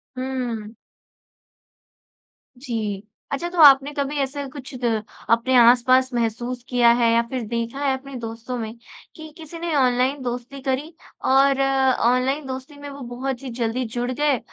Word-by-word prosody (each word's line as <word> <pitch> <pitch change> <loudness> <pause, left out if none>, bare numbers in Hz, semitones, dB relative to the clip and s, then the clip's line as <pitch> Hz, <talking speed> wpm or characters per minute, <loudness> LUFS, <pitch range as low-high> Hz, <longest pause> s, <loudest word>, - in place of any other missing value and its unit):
हुँ। 250 -4 -4 1.8
जी, 220 -6 -4 0.3
अच्छा 335 +5 -2
तो 355 - -9
आपने 280 0 +7
कभी 285 +1 -2
ऐसे 280 +1 -3
कुछ 275 0 -10
अ, 220 -2 0 0.3
अपने 235 +3 +3
आस-पास 255 +2 +5
महसूस 240 +1 -2
किया 245 -2 +5
है 230 -1 +4
या 230 - +4
फ़िर 255 0 -3
देखा 235 +3 -3
है 270 - +2
अपने 275 0 -11
दोस्तों 230 +2 -6
में 220 -2 -5 0.4
कि 315 -1 -10
किसी 325 0 -10
ने 340 -1 -3
ऑनलाइन 260 +1 +2
दोस्ती 245 +2 -5
करी। 270 +4 -2 0.3
और 270 +1 +4
ऑनलाइन 265 +1 +2
दोस्ती 265 +3 -7
में 285 0 -8
वो 280 0 -10
बहुत 265 0 -4
ही 265 - -5
जल्दी 235 +3 -1
जुड़ 245 +1 -1
गए 285 -1 +1
260 Hz, 155 wpm, -22 LUFS, 240-275 Hz, 1.8 s, आपने